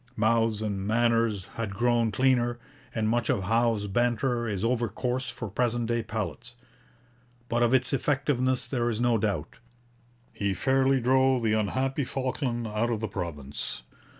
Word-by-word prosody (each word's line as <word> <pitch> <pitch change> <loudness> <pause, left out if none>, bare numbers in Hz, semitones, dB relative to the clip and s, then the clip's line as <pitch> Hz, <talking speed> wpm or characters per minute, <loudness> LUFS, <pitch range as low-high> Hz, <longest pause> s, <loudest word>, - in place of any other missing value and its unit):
Mouths 110 -1 +2
and 100 -2 -2
manners 115 -3 +2
had 110 -4 -4
grown 120 0 +2
cleaner, 120 +1 +2 0.4
and 110 -1 0
much 120 +2 0
of 115 -7 +1
Howe's 115 +1 +1
banter 120 +3 0
is 100 -2 -2
over 120 0 +1
coarse 125 +3 -2
for 110 - -6
present 120 +3 0
day 120 0 0
palates. 110 +2 -5 0.9
But 120 0 0
of 120 -1 +4
its 130 +1 +2
effectiveness 135 -2 +1
there 120 -3 0
is 110 -2 -2
no 120 -2 +2
doubt. 100 -8 -2 0.7
He 100 -1 -1
fairly 135 +5 +2
drove 130 0 +3
the 110 -1 +2
unhappy 130 +7 0
Falkland 130 -2 -2
out 110 +2 -1
of 115 -3 -1
the 110 - -2
province. 75 -10 -5
115 Hz, 150 wpm, -27 LUFS, 110-125 Hz, 0.9 s, of